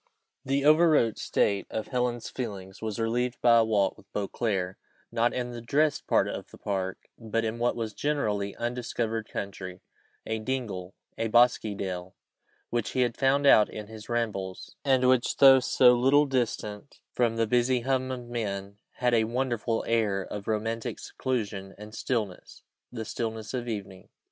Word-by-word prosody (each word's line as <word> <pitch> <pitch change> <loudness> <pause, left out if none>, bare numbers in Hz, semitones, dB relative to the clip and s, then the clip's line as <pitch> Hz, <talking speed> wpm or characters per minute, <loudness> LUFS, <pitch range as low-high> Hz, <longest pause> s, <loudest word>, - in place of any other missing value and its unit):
The 140 +1 0
overwrought 155 -7 +5
state 100 -1 +1
of 110 - -4
Helen's 125 -2 -1
feelings 100 -6 -6
was 110 0 -3
relieved 120 +2 0
by 120 -1 +6
a 115 - +6
walk 105 -4 +1
with - - -20
Beauclerc, 100 -2 -2 0.3
not 115 +1 +2
in 125 -1 -3
the 120 -1 -7
dressed 145 +5 +1
part - - +3
of - - -6
the - - -14
park, 95 -2 -2 0.2
but 115 0 -1
in 110 +1 -3
what 120 +1 +1
was 110 -2 -3
generally 105 -8 -1
undiscovered 115 -2 -3
country: 95 -2 -6 0.4
a 110 0 -2
dingle, 110 -6 -4 0.2
a 115 - +1
bosky 120 -2 +4
dell, 90 -2 -5 0.6
which 120 -2 -1
he 130 - +1
had 120 -2 +1
found 140 +1 +2
out 110 -6 +7
in 105 - -7
his 110 0 -11
rambles, 105 -6 -3
and 130 -2 +3
which, 130 -1 +2
though 135 -1 +9
so 125 -1 +5
little 135 +4 +4
distant 120 -4 -3
from 120 -2 +1
the 115 0 +2
busy 125 +2 +2
hum 130 +1 0
of 125 -2 -5
men, 100 -4 -4
had 125 -1 +1
a 110 -1 +4
wonderful 120 -1 -1
air 105 -4 +1
of 100 +1 -7
romantic 110 +1 -2
seclusion 105 -7 -4
and 105 +1 -10
stillness 110 -5 -3 0.3
the 115 -2 -5
stillness 110 0 -4
of 120 -2 -3
evening. 95 -4 -6
115 Hz, 165 wpm, -28 LUFS, 105-125 Hz, 0.6 s, though